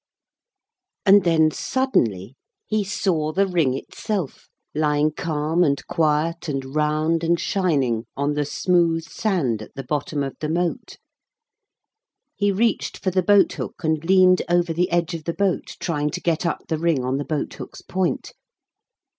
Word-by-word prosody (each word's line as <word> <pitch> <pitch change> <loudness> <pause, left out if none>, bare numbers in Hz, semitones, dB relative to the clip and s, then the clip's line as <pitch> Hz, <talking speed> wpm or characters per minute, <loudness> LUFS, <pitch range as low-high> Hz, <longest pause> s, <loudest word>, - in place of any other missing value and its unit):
And 200 0 +7
then 160 -2 +4
suddenly 120 - 0 0.3
he 215 -1 0
saw 180 -5 -1
the 195 +5 +2
ring 165 -9 +1
itself, 190 - -4 0.3
lying 150 0 +2
calm, 155 +2 0
and 140 -4 0
quiet, 160 +1 0
and 135 -1 -4
round, 155 +2 +1
and 170 +1 +2
shining, 140 - 0
on 140 +1 0
the 150 0 0
smooth 165 +2 +1
sand 160 - -1
at 110 - -12
the 135 - -5
bottom 145 +2 -2
of 135 - -5
the 155 - -3
moat. 170 +1 -2 1.4
He 205 -1 +1
reached 220 +2 0
for 185 - -1
the 185 +1 +2
boat 205 +2 +4
hook - - -7
and 155 -1 0
leaned 185 +1 +5
over 175 -1 +2
the 180 +2 +1
edge 170 0 0
of 160 -2 -6
the 170 - -2
boat 195 -3 -1
trying 150 -4 -1
to - - -4
get 170 0 0
up - - -3
the 160 - -1
ring 165 -6 +1
on 130 +1 0
the 145 - -2
boat 150 -3 -3
hook's - - -10
point. 185 -1 -2
165 Hz, 160 wpm, -22 LUFS, 150-180 Hz, 1.4 s, And